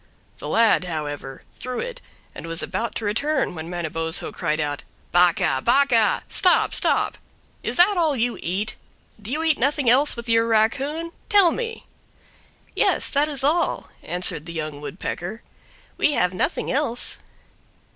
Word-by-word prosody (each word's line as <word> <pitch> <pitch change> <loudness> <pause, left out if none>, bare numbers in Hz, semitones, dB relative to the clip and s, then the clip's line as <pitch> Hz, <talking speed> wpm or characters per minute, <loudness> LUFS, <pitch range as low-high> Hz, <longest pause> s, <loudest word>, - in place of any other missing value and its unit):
The - - -7
lad, 225 -5 +3
however, 145 -5 -5 0.2
threw 255 -1 -5
it, - - -6 0.3
and - - -9
was 165 0 -1
about 235 - -3
to 225 - -3
return 270 +7 0
when 160 0 -7
Manabozho 165 -2 -2
cried 155 +1 -2
out, 145 -1 -2 0.3
"Bakah! 175 -6 +3
Bakah! 240 -4 +3
Stop, 365 -2 +3
stop; - - +1 0.4
is - - -3
that 370 +3 +5
all 320 -4 +2
you 240 0 -1
eat? 195 +6 -1 0.4
Do 210 - -7
you 305 +5 -2
eat 320 -3 +2
nothing 280 +1 +1
else 275 +4 +3
with 235 0 -8
your 230 0 +3
raccoon? 275 +9 0 0.2
Tell 400 -5 +6
me!" 455 +1 -5 0.9
"Yes, - - +1
that 295 +2 +2
is 275 -3 -3
all, 325 +5 +1
answered 175 -3 -2
the 170 - -7
Young 155 -3 -5
Woodpecker; 180 +6 -6 0.6
"we 295 - +3
have 180 -7 +1
nothing 185 - 0
else." 265 -4 -1
230 Hz, 150 wpm, -23 LUFS, -, 0.9 s, Tell